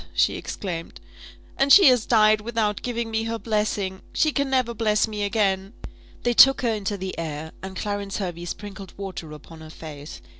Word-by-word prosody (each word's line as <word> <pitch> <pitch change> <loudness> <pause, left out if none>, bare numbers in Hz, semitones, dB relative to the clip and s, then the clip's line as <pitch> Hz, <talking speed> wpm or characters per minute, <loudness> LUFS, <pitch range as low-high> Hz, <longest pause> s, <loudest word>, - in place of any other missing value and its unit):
she - - +3
exclaimed; 170 -4 -6 0.6
"and 275 +1 +3
she 395 - +9
has 250 -4 +5
died 215 -2 +4
without 215 -2 -1
giving 235 -2 -3
me 220 0 -1
her 230 0 -2
blessing! 210 -4 -2
She 310 - +2
can 280 -1 -1
never 255 -3 +1
bless 215 -1 +1
me 210 -1 -5
again." 200 -1 0 0.5
They 240 - +2
took 270 +3 +7
her 235 -2 +2
into 205 -1 -3
the 190 0 -5
air, 160 -1 -5
and 190 0 -7
Clarence 205 0 -3
Hervey 175 -3 -4
sprinkled 195 0 -8
water 190 -5 -7
upon 160 +2 -12
her 155 - -11
face. 150 - -9
205 Hz, 180 wpm, -24 LUFS, 185-230 Hz, 0.6 s, she